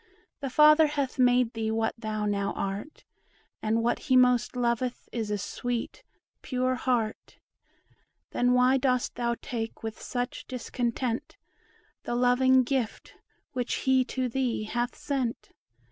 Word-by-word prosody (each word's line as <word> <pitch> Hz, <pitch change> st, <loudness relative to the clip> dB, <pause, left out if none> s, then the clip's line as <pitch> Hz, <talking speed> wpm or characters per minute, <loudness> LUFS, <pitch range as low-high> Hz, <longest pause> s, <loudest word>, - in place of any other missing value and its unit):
The 275 Hz, -, -3 dB
Father 305 Hz, +3 st, +6 dB
hath 285 Hz, -3 st, -2 dB
made 245 Hz, -1 st, +4 dB
thee 225 Hz, -1 st, -2 dB
what 225 Hz, 0 st, 0 dB
thou 215 Hz, -2 st, -3 dB
now 200 Hz, -1 st, 0 dB
art; 200 Hz, +10 st, -5 dB, 0.6 s
And 225 Hz, +1 st, +1 dB
what 240 Hz, -, +1 dB
he 260 Hz, -, +6 dB
most 250 Hz, -1 st, +3 dB
loveth 245 Hz, 0 st, -1 dB
is 225 Hz, -3 st, -3 dB
a 210 Hz, -, 0 dB
sweet, 240 Hz, +4 st, -4 dB, 0.4 s
pure 255 Hz, -2 st, 0 dB
heart. 245 Hz, -4 st, -2 dB, 0.9 s
Then 245 Hz, 0 st, +2 dB
why 250 Hz, +1 st, +4 dB
dost 255 Hz, -1 st, +1 dB
thou 235 Hz, -1 st, -1 dB
take 225 Hz, -2 st, -5 dB
with 220 Hz, -1 st, -5 dB
such 245 Hz, -1 st, -4 dB
discontent 245 Hz, -1 st, -3 dB, 0.6 s
The 240 Hz, -, -3 dB
loving 255 Hz, +1 st, +4 dB
gift 250 Hz, -3 st, -2 dB, 0.4 s
which 250 Hz, -2 st, -2 dB
he 260 Hz, -1 st, +4 dB
to 255 Hz, 0 st, -2 dB
thee 245 Hz, -3 st, -1 dB
hath 240 Hz, +3 st, -2 dB
sent? 255 Hz, -5 st, -3 dB
245 Hz, 135 wpm, -28 LUFS, 230-255 Hz, 0.9 s, Father